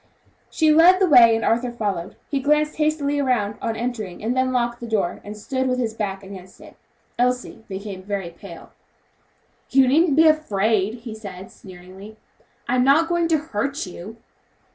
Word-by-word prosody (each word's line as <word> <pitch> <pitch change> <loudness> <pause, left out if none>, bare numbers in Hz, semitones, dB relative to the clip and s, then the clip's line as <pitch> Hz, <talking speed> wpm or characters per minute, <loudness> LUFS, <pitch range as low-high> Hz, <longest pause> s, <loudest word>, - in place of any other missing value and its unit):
She 315 -1 +2
led 345 +4 +6
the 385 - +4
way 240 -7 +7
and 225 - -2
Arthur 240 +2 0
followed. 200 -6 -4
He 280 - -2
glanced 300 +2 +1
hastily 300 -2 0
around 235 -7 0
on 225 - -2
entering 225 -6 -5
and 235 +3 -1
then 260 0 +1
locked 240 -1 -1
the 235 - -7
door 210 -6 -2
and 210 +1 -9
stood 260 +5 -3
with 255 0 0
his 235 -3 -2
back 200 -3 -4
against 190 -1 -12
it. - - -15 0.4
Elsie 250 -2 -1
became 195 -1 -7
very 195 -3 -5
pale. 170 -1 -13 1.0
"You 265 0 +4
needn't 300 +3 +3
be 320 +2 +5
afraid" 220 -7 +1
he 230 -2 -8
said, 195 -4 -10
sneeringly, 190 +3 -13 0.5
"I'm 250 +1 +2
not 300 +5 +3
going 345 -1 +1
to 325 -1 +2
hurt 280 0 -3
you!" 185 +5 -10
235 Hz, 170 wpm, -22 LUFS, 200-275 Hz, 1.0 s, way